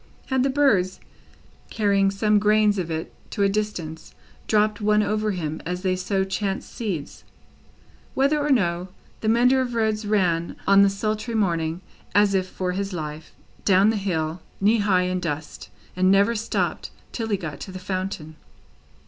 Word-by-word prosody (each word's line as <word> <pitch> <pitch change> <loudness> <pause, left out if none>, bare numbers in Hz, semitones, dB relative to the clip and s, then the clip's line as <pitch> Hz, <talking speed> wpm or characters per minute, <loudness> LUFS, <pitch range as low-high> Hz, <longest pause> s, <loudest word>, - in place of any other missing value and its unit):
Had 260 -1 +2
the 270 - +2
birds, 220 -10 +2 0.7
carrying 200 -2 +2
some 210 +1 +2
grains 210 -1 +3
of 170 -2 -3
it 160 0 -4 0.2
to 205 - -1
a 200 - +4
distance, 180 -7 -4 0.3
dropped 215 0 +2
one 210 0 +3
over 215 +1 0
him 160 -5 -3
as 180 +2 -4
they 185 -1 +1
sow 190 +1 0
chance 195 0 -2
seeds? 195 - -5 0.9
Whether 280 +3 +2
or 295 0 -1
no, 180 -8 +1 0.3
the 220 - -1
mender 250 +3 +4
of 245 -2 -3
roads 220 -2 0
ran, 175 -5 +1
on 200 0 +6
the 200 - +6
sultry 215 +3 -2
morning, 170 -5 0 0.3
as 205 -1 +5
if 185 -1 +1
for 185 -1 -3
his 195 +1 -3
life, 155 -2 -6 0.3
down 195 +2 +5
the - - -2
hill, 170 -4 -2 0.2
knee 215 +3 +3
high 190 -3 +3
in 185 0 -1
dust, 155 -3 -5 0.3
and 185 +1 +3
never 200 +4 +4
stopped 225 0 -2 0.2
till 225 -2 -3
he 205 - +1
got 155 -6 -6
to 190 - -7
the 185 - -7
fountain. 185 -4 -4
195 Hz, 165 wpm, -24 LUFS, 180-215 Hz, 0.9 s, on